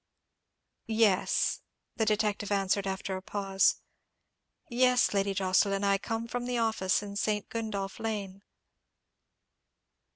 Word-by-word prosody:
"Yes," 220 -4 +2 0.4
the 220 -2 +1
detective 210 -1 0
answered, 195 0 +1
after 190 0 -3
a 185 - -5
pause, 195 0 +1 0.9
"yes, 250 -1 +3
Lady 195 0 0
Jocelyn, 195 +1 +2
I 200 0 +3
come 225 +2 -3
from 245 +1 -4
the 250 -1 -1
office 220 -4 +1
in 200 -1 -7
St. 210 0 -1
Gundolph 205 -4 -4
Lane." 200 -3 -4
205 Hz, 110 wpm, -29 LUFS, 195-225 Hz, 0.9 s, yes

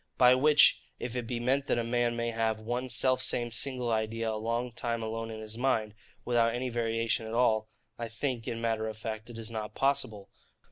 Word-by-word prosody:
By 125 0 +7
which, 145 +3 +6 0.2
if 120 0 -5
it 120 -2 -3
be 120 -1 -2
meant 135 +4 +1
that - - +2
a 120 - +1
man 120 0 +1
may 115 0 -1
have 115 -1 0
one 120 +4 -3
self 130 +2 +2
same 120 -2 0
single 125 0 -1
idea 110 +1 -1
a - - -2
long 115 +3 -2
time 115 0 -3
alone 115 +1 -3
in 110 -1 -6
his 110 +1 -7
mind, 110 -5 +1 0.3
without 115 -1 +2
any 125 +1 -2
variation 115 -1 0
at 110 - -4
all, 110 -3 +2 0.3
I 115 - -3
think, 120 +1 -3
in 115 - -3
matter 115 -1 0
of 110 -1 -5
fact, 110 0 -5
it 120 - -9
is 115 0 -3
not 110 -1 -5
possible. 135 -8 0
115 Hz, 215 wpm, -30 LUFS, 110-125 Hz, 0.3 s, By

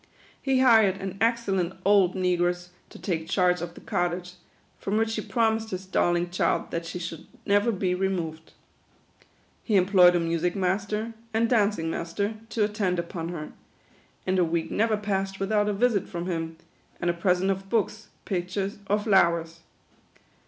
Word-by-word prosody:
He 265 -1 +2
hired 220 -7 +6
an 195 -1 -5
excellent 200 -6 +1
old 195 -2 +4
negress 180 -1 0 0.2
to - - -12
take 160 -4 -3
charge 180 -2 +2
of 170 0 -6
the - - -12
cottage, 175 0 -2 0.5
from 200 +2 -1
which 225 0 +1
he 215 - -2
promised 225 -1 0
his 190 -1 -5
darling 175 -2 +1
child 180 - 0
that 170 0 -3
she 180 - -5
should 170 -2 -7 0.2
never 205 +3 +3
be 185 -3 0
removed. 175 -4 -3 1.1
He 215 - 0
employed 180 -2 +6
a - - +3
music 170 +1 0
master, 205 +4 -1 0.2
and 230 +1 +3
dancing 205 -8 +1
master, 200 +7 -2 0.2
to 225 - 0
attend 205 -3 0
upon 170 -1 -4
her; 160 -3 -6 0.7
and 185 0 +1
a - - +5
week 165 -1 -1
never 220 0 +2
passed 195 -2 -2
without 205 +1 +1
a - - +2
visit 215 -2 +1
from 170 0 -4
him, 165 -2 -3 0.4
and 175 - +1
a - - -4
present 180 +2 +1
of 195 0 -4
books, 220 -2 -1 0.2
pic 180 -2 -2
tures, 195 +1 -3
or 205 - +4
flowers. 170 -5 +2
190 Hz, 165 wpm, -26 LUFS, 175-205 Hz, 1.1 s, hired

